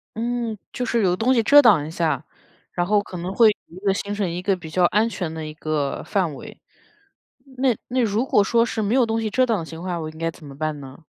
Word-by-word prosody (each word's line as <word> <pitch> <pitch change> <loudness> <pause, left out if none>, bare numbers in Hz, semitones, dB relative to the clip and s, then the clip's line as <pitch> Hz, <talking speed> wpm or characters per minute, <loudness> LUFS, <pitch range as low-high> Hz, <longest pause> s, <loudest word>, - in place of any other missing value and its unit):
嗯， 235 -1 -2 0.2
就 250 - -2
是 235 -2 +1
有 180 -2 +3
东 235 +7 +2
西 230 -3 +2
遮 290 +6 +8
挡 210 - +5
一 155 - -7
下， 155 -4 -1 0.5
然 175 - -1
后 205 +2 +3
可 185 -2 -9
能 180 +2 -4
会 225 +1 +6 0.2
一 170 - -14
个 195 - +3
形 200 +1 -4
成 205 -3 -1
一 175 +2 -4
个 195 +1 +1
比 170 -3 -10
较 180 +3 +1
安 210 +5 +3
全 180 -7 -4
的 160 -1 -6
一 155 - -7
个 155 -3 -2
范 185 -7 -1
围。 - - -11 1.0
那 255 -2 +2
那 255 +1 0
如 225 +2 +1
果 210 -6 +3
说 230 +3 +2
是 225 -2 -3
没 210 +4 0
有 255 -3 +4
东 225 0 -1
西 220 - -1
遮 255 +5 +2
挡 225 -5 0
的 165 - -5
情 160 +1 -9
况， 180 -2 -3
我 155 - -4
应 155 - -13
该 165 +1 -2
怎 155 - -15
么 140 -1 -11
办 155 -1 -2
呢？ 135 +3 -12
195 Hz, 280 characters per minute, -22 LUFS, 160-225 Hz, 1.0 s, 遮